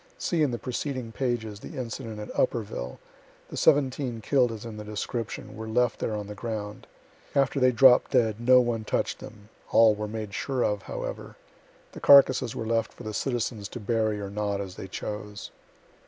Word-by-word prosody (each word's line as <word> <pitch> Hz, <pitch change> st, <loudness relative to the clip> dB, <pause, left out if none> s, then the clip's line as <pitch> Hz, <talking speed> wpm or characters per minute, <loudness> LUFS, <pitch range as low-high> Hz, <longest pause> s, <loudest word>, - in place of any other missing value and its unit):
(See 170 Hz, -3 st, 0 dB
in 150 Hz, -, +3 dB
the 120 Hz, -, -2 dB
preceding 125 Hz, -1 st, -4 dB
pages, 115 Hz, -4 st, -2 dB
the -, -, -9 dB
incident 115 Hz, -2 st, -5 dB
at 105 Hz, -, -7 dB
Upperville 100 Hz, -, -1 dB, 0.5 s
the -, -, -7 dB
seventeen 130 Hz, -4 st, +2 dB
kill'd 125 Hz, +1 st, +2 dB
as 110 Hz, 0 st, -7 dB
in 110 Hz, -2 st, -7 dB
the 105 Hz, -, -6 dB
description, 105 Hz, +2 st, -5 dB
were 110 Hz, 0 st, -6 dB
left 125 Hz, +2 st, +1 dB
there 110 Hz, -, -2 dB
on 105 Hz, -1 st, -4 dB
the 105 Hz, -, -7 dB
ground. 105 Hz, -1 st, -5 dB, 0.5 s
After 140 Hz, 0 st, +2 dB
they 130 Hz, -1 st, +5 dB
dropt 125 Hz, +1 st, +6 dB
dead, 115 Hz, -5 st, +2 dB
no 125 Hz, +2 st, +6 dB
one 120 Hz, -2 st, -1 dB
touch'd -, -, -1 dB
them 110 Hz, -6 st, -12 dB, 0.2 s
all 115 Hz, -1 st, +6 dB
were 105 Hz, 0 st, -4 dB
made 105 Hz, -1 st, -5 dB
sure 130 Hz, +3 st, -1 dB
of, 105 Hz, -1 st, 0 dB
however. -, -, -6 dB, 0.6 s
The -, -, -9 dB
carcasses 130 Hz, -4 st, +6 dB
were 110 Hz, -, -4 dB
left 115 Hz, 0 st, 0 dB
for -, -, -12 dB
the 110 Hz, -1 st, -5 dB
citizens 115 Hz, -3 st, -2 dB
to 125 Hz, -, -7 dB
bury 110 Hz, -1 st, 0 dB
or 100 Hz, -1 st, -5 dB
not, 100 Hz, -1 st, -2 dB
as 95 Hz, -2 st, -5 dB
they 95 Hz, -, -8 dB
chose.) 105 Hz, +1 st, -6 dB
115 Hz, 185 wpm, -27 LUFS, 105-125 Hz, 0.6 s, dropt